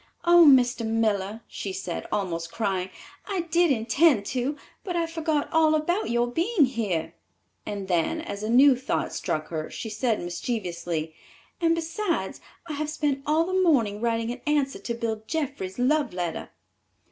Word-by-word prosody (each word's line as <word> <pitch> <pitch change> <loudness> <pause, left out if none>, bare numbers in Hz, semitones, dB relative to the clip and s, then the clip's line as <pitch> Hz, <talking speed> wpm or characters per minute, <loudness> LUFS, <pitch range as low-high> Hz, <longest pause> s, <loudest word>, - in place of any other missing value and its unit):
"Oh, 345 -1 +7
Mr. 245 -3 +4
Miller," 220 -2 0
she 195 - -5
said, 180 -2 -5
almost 170 -4 -2
crying, 190 -4 -1 0.4
"I 390 -4 -1
did 340 +1 +2
intend 245 0 +3
to, 265 +3 -1 0.3
but 360 -3 -4
I 340 -1 +1
forgot 320 -3 -1
all 315 -1 +4
about 345 - 0
your 240 +1 +2
being 335 - +2
here"; 190 -10 -2 0.5
and 200 -2 -4
then, 175 - +1
as 260 -11 -6
a 215 - -3
new 260 +3 +7
thought 255 - -2
struck 155 0 -3
her, 155 -2 -4
she 225 - -6
said 220 +1 0
mischievously, 175 -4 -3 0.5
"and 330 -1 +3
besides 335 +3 -2 0.2
I 320 - -5
have 300 +1 -3
spent 295 -3 -1
all 315 +2 +3
the 370 - -4
morning 230 - +2
writing 230 0 0
an 245 0 -7
answer 285 -2 +1
to 235 - -4
Bill 225 -2 -3
Jeffrey's 275 - -3
love 275 -1 +1
letter!" 175 -2 -3
245 Hz, 160 wpm, -26 LUFS, 200-310 Hz, 0.5 s, Oh